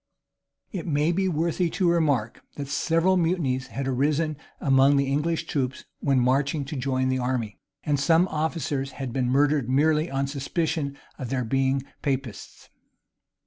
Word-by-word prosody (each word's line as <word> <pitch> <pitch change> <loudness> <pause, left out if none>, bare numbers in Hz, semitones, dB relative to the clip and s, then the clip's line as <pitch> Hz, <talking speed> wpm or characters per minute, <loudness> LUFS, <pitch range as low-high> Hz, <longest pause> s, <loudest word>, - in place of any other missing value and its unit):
[] - - -60 0.3
It 180 -5 -5
may 150 +1 +2
be 190 +2 +1
worthy 170 +2 0
of - - -6
remark, 155 - +1
that 140 -1 -5
several 165 +6 +2
mutinies 160 -7 0
had 135 0 -4
arisen 150 +4 +1 0.2
among 135 0 +4
the 140 - +2
English 150 +5 0
troops 130 -3 -2
when 135 -2 +2
marching 140 +3 +1
to 150 - -6
join 130 -1 0
the 130 0 0
army; 125 -4 -2 0.2
and 145 -2 +1
some 165 +5 +4
officers 150 -3 -2
had 130 -4 -5
been 125 -2 0
murdered 140 -1 +2
merely 155 +4 +2
on 135 0 -1
suspicion 140 +1 -2 0.2
of 130 -4 -5
their 130 -2 -1
being 135 +2 +1 0.2
Papists. 135 -7 -4
140 Hz, 155 wpm, -25 LUFS, 130-160 Hz, 0.3 s, among